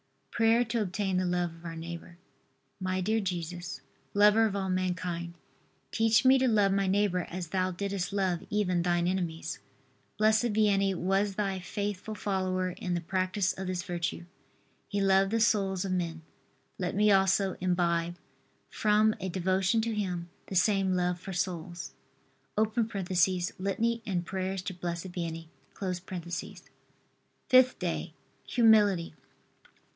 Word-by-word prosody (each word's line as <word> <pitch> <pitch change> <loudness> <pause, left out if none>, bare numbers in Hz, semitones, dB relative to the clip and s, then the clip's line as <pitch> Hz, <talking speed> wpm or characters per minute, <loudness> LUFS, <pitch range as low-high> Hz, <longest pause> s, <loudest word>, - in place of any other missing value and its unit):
PRAYER 230 +1 +4
TO 230 -1 -1
OBTAIN 195 -1 -1
THE 185 - +1
LOVE 175 -1 0
OF 165 +1 -15
OUR 165 -1 -5
NEIGHBOR. 170 +1 -8 0.6
My 185 0 -1
dear 220 +4 +1
Jesus, 180 -2 -4 0.3
lover 210 +2 +6
of 200 - -4
all 190 -1 -2
mankind, 180 -2 -2 0.6
teach 225 +1 +3
me 265 +1 +7
to 260 - +3
love 205 -4 +3
my 195 0 +1
neighbor 190 -2 +1
as 175 -2 -5
Thou 185 +1 0
didst 195 0 -3
love 190 -3 0
even 185 -4 +1
Thine 175 0 +1
enemies. 175 -3 -2 0.6
Blessed 220 +1 +3
Vianney 200 -2 +3
was 195 +3 0
Thy 195 -2 -1
faithful 205 +3 -4
follower 185 -2 -1
in 180 0 -3
the 175 - -2
practice 185 +2 0
of 190 0 -6
this 180 -1 -2
virtue. 175 -1 -3 0.6
He 205 - -2
loved 195 0 +4
the 230 +2 +1
souls 195 -4 +2
of 190 - -2
men. 170 -3 -2 0.6
Let 180 -1 -2
me 210 +1 +4
also 195 0 +3
imbibe, 175 -1 +1 0.6
from 215 0 +3
a 190 -1 -3
devotion 185 +4 +1
to 230 0 -2
him, 180 -5 -3 0.2
the 190 - -6
same 195 0 +3
love 180 0 0
for 190 +2 -7
souls. 175 -1 -4 0.6
[Litany 200 0 0
and 180 -3 -1
prayers 190 0 -3
to 190 - -4
Blessed 175 0 -5
Vianney.] 165 -2 -5 2.0
FIFTH 255 0 +5
DAY. - - -3 0.3
HUMILITY. 210 -8 +4
190 Hz, 140 wpm, -29 LUFS, 180-205 Hz, 2.0 s, me